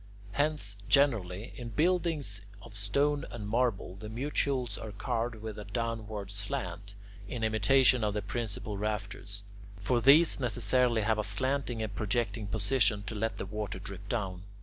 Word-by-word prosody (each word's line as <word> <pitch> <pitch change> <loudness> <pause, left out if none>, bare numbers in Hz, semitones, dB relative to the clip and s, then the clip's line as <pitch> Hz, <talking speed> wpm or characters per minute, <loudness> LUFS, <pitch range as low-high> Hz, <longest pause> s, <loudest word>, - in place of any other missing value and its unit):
Hence 145 -7 +1
generally, 110 -7 +2
in 120 -2 -6
buildings 155 - +1 0.2
of 110 -2 -12
stone 140 +9 +1
and 105 -3 -6
marble, 110 -5 0
the 105 +1 -7
mutules 130 -1 -1
are 110 - -6
carved 115 +3 -2
with 110 -1 -7
a - - -5
downward 110 -2 -3
slant, 100 -1 -4 0.3
in 115 +1 -4
imitation 120 +3 +4
of 105 -1 0
the 105 - -1
principal 105 -1 -3
rafters. 105 -1 -3 0.4
For 120 +4 +1
these 150 +6 +7
necessarily 120 -1 +2
have 110 0 +2
a - - +1
slanting 130 +1 0
and 105 -2 -4
projecting 110 +1 -1
position 105 -1 +2
to 110 - -5
let 110 -1 -2
the - - -4
water 105 -1 -4
drip 100 +1 -9
down. 95 -6 -2
110 Hz, 150 wpm, -31 LUFS, 100-125 Hz, 0.4 s, these